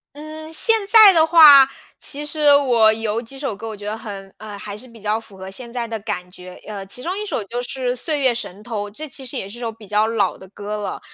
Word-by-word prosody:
嗯， 310 +1 -9
现 450 +8 +5
在 430 -2 +8
的 320 -2 +4
话， 295 -5 +8 0.3
其 295 +1 -1
实 295 -1 +4
我 240 -6 +4
有 220 +1 -2
几 270 +3 -9
首 270 -6 -4
歌， 225 +3 -8
我 220 -1 -7
觉 205 - -11
得 210 +1 -3
很 200 -3 -9
呃， 210 -2 -9
还 205 0 -8
是 250 +5 -10
比 230 -2 -16
较 210 +1 -1
符 210 -4 -16
合 190 0 -9
现 235 +3 -7
在 235 -1 -4
的 225 -1 -5
感 180 -3 -6
觉。 180 0 -12
呃， 205 -2 -6
其 250 +5 -5
中 360 +2 -3
一 425 - -4
首 320 - -3
就 240 +5 -5
是 255 0 -3
《岁 300 +4 -1
月 260 -3 +2
神 210 -3 -6
偷》。 215 -3 -5
这 305 +9 -7
其 270 -1 -6
实 260 +1 -6
也 195 - -5
是 235 +4 -11
首 230 -2 -4
比 220 -1 -15
较 210 +2 +1
老 210 -4 0
的 190 - -14
歌 205 +1 -6
了， 205 - -5
230 Hz, 275 characters per minute, -20 LUFS, 210-280 Hz, 0.3 s, 在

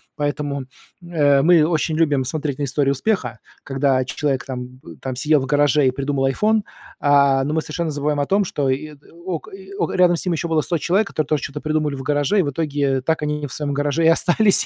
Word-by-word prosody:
поэтому, 145 -1 -2 0.4
э, 145 -5 +2
мы 165 -1 +5
очень 160 -1 0
любим 145 -5 +2
смотреть 145 0 -3
на - - -1
истории 140 0 +1
успеха, 135 - -1 0.2
когда 135 -2 +1
человек 135 0 -2
там, 125 -1 -7
м, - - -11
там 130 -2 -4
сидел 150 +1 +2
в - - -3
гараже 145 0 +3
и 130 - +3
придумал 135 0 -1
iPhone, 215 +10 +2 0.4
а, 140 -2 +4
но 150 +2 -2
мы 160 - +1
совершенно 160 +1 -3
забываем 145 0 -1
о - - 0
том, 200 +3 +2
что 140 -5 -1
и 150 +3 -2 0.3
ок 175 -4 -4
и 195 0 -11
о - - -1
рядом 180 -1 +4
с 170 - -5
ними 170 -3 0
было 160 -1 +1
еще - - -1
100 170 - 0
человек, 195 +7 +1
которые 155 -6 -2
тоже 155 -2 0
чё-то 145 +1 -5
придумали 155 -2 -1
в 135 - -7
гараже, 145 +8 +1
и - - +6
в 145 -4 -2
итоге 140 -3 -1
так 160 +3 -1
они 150 0 -2
в - - -13
своем 145 -2 -3
гараже 145 +3 0
и - - +6
остались, 185 +5 +3
145 Hz, 225 wpm, -21 LUFS, 140-160 Hz, 0.4 s, и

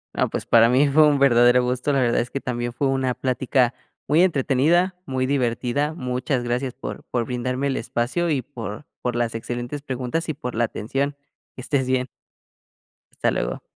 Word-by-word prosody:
No - - +1
pues, - - -4
para 115 0 +6
mí 130 +4 +4
fue 155 +2 +6
un 145 -1 +3
verdadero 125 -2 +5
gusto, 125 +3 -1
la 140 - +2
verdad 120 -2 +2
es 120 - -5
que 140 - -3
también 120 -2 -3
fue 135 +4 -1
una 130 -2 0
plática, 130 -1 +1 0.3
muy 150 +4 +4
entretenida, 170 +3 +2
muy 130 -1 -1
divertida. 130 +2 0
Muchas 125 -2 -2
gracias 120 +1 -2
por 135 - -7
por 120 -2 -1
brindarme 125 +2 -2
el 135 - -1
espacio 120 +10 -1
y 145 -4 +1
por 115 -1 -8 0.2
por 125 -1 -2
las 120 -1 0
excelentes 120 +5 -4
preguntas 130 +4 -3
y - - 0
por 125 -4 -6
la 120 - +2
atención. 135 +6 -2 0.4
Que - - -8
estés 130 0 0
bien. 130 0 +1 1.1
Hasta - - 0
luego. - - -2
130 Hz, 185 wpm, -23 LUFS, 120-140 Hz, 1.1 s, para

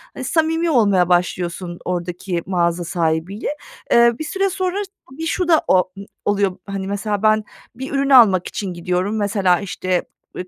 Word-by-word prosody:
eee, - - -6
samimi 325 +1 +1
olmaya 200 - +3
başlıyorsun 175 0 -1
oradaki 180 0 -3
mağaza 175 -2 0
sahibiyle. 170 +4 -2 0.4
Eee, 235 0 +6
bir 315 - -2
süre 390 +4 -1
sonra 375 0 -2 0.4
bir 325 - -3
şu 350 +2 -1
da 320 -2 +4
o 185 0 +3
um 195 +1 -9 0.2
oluyor. 200 -2 +1
Hani, 195 -1 -5
mesela 205 +1 -2
ben 215 0 +4 0.3
bir 265 +3 -6
ürün 275 0 0
almak 215 -9 +6
için 190 -3 -4
gidiyorum. 180 +4 -1
Mesela 200 -3 +2
işte, 185 -2 -2 0.3
eee, 180 - -6
195 Hz, 160 wpm, -20 LUFS, 180-235 Hz, 0.4 s, Eee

